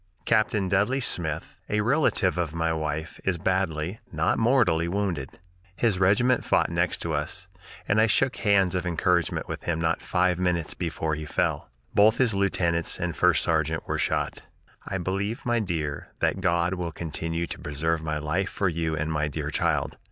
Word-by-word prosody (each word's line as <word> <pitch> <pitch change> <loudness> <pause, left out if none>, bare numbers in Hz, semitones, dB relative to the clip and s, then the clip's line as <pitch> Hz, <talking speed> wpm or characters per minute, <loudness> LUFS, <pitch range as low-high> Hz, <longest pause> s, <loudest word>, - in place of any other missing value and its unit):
"Captain 110 -3 +2
Dudley 105 +8 +2
Smith 80 - -2
[a 105 0 +1
relative 115 - +2
of 85 -3 -2
my 80 0 0
wife] 80 0 -4
is 95 -2 0
badly 95 +1 -1
(not 80 0 +1
mortally) 110 -9 +3
wounded. 90 -7 -2 0.4
His 105 -5 +1
regiment 120 +7 +3
fought - - +2
next 85 +1 0
to 85 - -2
us, 75 +5 -3 0.4
and 110 +2 +3
I 110 - +5
shook 130 +4 +2
hands 100 -4 +3
of 90 -1 -1
encouragement 85 0 +1
with - - -5
him 85 -2 0
not 80 0 0
five 90 0 +1
minutes 90 -3 0
before 80 -2 -2
he 75 +1 -4
fell. 65 - -1 0.2
Both 110 +3 +5
his 125 -5 +3
lieutenants 85 -4 0
and 85 -2 -2
first 90 -6 +4
sergeant 80 -1 0
were - - -1
shot. - - -1 0.5
"I 95 - -2
believe, 100 +5 -3
my 120 -1 +2
dear, 80 -8 -3
that - - 0
God 85 +1 +1
will 90 -2 -3
continue 80 +1 -3
to - - -7
preserve 80 +2 -1
my 75 -1 -2
life 75 +6 -1
for 100 - -1
you 80 -1 -1
and 80 +1 -2
my 75 0 0
dear 75 - -4
child. - - 0
85 Hz, 175 wpm, -26 LUFS, 80-100 Hz, 0.5 s, I